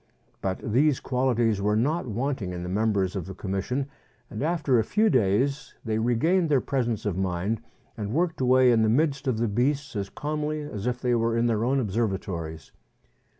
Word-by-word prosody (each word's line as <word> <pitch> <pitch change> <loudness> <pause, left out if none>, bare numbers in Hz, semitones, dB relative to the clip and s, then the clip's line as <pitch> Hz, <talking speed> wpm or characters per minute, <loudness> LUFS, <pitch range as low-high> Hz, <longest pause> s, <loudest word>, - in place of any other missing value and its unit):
But 95 -1 -1 0.2
these 145 +2 +3
qualities 120 -5 +1
were 105 +1 +2
not 145 +8 0
wanting 115 -4 -2
in 90 0 -5
the 90 - -5
members 100 -1 0
of 95 -3 -4
the 95 - -7
Commission, 100 +9 -2 0.5
and 110 - -5
after 150 -5 +2
a - - +2
few 210 - +2
days 130 +9 +1
they 110 -1 0
regained 160 +10 +2
their 140 -3 +4
presence 120 -6 -2
of 95 -3 -1
mind, 95 +4 -1 0.3
and 105 -1 -4
worked 165 +2 0
away 130 0 +5
in 115 -1 +4
the 110 - +3
midst 140 +2 +1
of 125 -4 +1
the 115 +1 +1
beasts 135 +6 0
as 100 -1 -3
calmly 150 0 -3
as 120 -7 -5
if 125 0 -1
they 125 -1 +1
were 115 0 +1
in 115 - +2
their 115 -2 +1
own 135 +3 +2
observatories. 95 - -3
120 Hz, 190 wpm, -26 LUFS, 105-140 Hz, 0.5 s, away